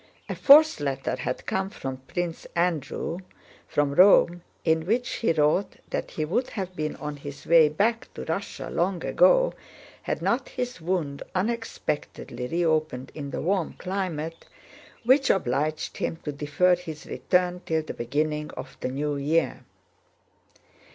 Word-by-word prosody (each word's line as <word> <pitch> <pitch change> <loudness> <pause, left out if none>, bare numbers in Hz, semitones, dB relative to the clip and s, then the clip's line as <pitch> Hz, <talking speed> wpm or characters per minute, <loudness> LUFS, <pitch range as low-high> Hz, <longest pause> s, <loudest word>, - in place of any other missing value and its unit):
A - - -3
fourth 305 - +7
letter 135 -2 -1
had 125 - -4
come 190 0 -1
from 135 -10 -5
Prince 170 +5 -4
Andrew, 170 0 -1 0.5
from 145 -1 +1
Rome, 175 0 +6 0.2
in 160 0 +2
which 240 +4 +1
he 230 - +2
wrote 160 +5 +2 0.2
that - - -2
he 155 - -2
would 240 +11 0
have 185 -3 -5
been 155 -2 -2
on 150 -1 -6
his 140 0 -9
way 165 -2 +6
back 220 +9 0
to - - -6
Russia 195 +5 -4
long 180 0 0
ago - - +4 0.5
had - - -2
not - - 0
his 245 -7 -4
wound 160 -5 -2
unexpectedly 185 - -3
reopened 155 -5 0
in 145 -2 -6
the - - -4
warm 185 -1 0
climate, 170 -4 -4 0.6
which 260 +3 +4
obliged 155 -1 0
him - - -1
to 150 - -3
defer 150 +5 +2
his 165 -3 -8
return 180 -1 0
till 160 -1 0
the 155 - -6
beginning 150 +5 -1
of 135 - -7
the - - -2
new 145 +2 -2
year. 155 +4 0
165 Hz, 145 wpm, -26 LUFS, 150-190 Hz, 0.6 s, fourth